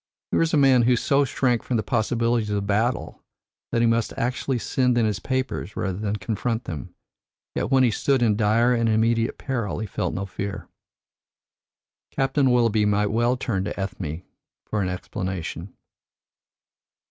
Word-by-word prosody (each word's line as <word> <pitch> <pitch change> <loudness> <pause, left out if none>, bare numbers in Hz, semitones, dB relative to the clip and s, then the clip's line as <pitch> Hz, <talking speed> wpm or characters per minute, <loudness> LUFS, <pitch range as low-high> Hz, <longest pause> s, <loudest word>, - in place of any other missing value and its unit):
Here - - +2
was 165 -1 +2
a - - +3
man 135 -3 +5
who 125 +1 +4
so 140 +4 +2
shrank 125 -2 +1
from 125 - -1
the 110 - -1
possibilities 115 0 0
of 100 -1 -1
battle, 110 +5 -1 0.5
that 115 - +1
he - - +4
must 115 -1 0
actually 125 +2 -1
send 125 +1 +1
in 115 - +3
his 105 -2 -1
papers 130 -5 -3
rather 95 0 -2
than 105 -1 -1
confront 110 +4 -2
them; 75 -7 -7 0.6
yet - - -2
when 135 -1 +4
he 120 - +4
stood 130 +4 +1
in 110 -3 +3
dire 115 +3 +3
and 115 -1 +1
immediate 115 +1 +1
peril 120 -7 -3
he 110 - -3
felt 100 - -3
no 95 - -2
fear. 100 +1 -5 1.4
Captain 135 0 +1
Willoughby 115 -3 +3
might 105 0 +2
well 120 +3 +2
turn 100 -7 -1
to 100 - -5
Ethne 90 -4 -4 0.4
for 105 - -2
an 90 - -1
explanation. 90 -1 -5
115 Hz, 165 wpm, -24 LUFS, 105-125 Hz, 1.4 s, man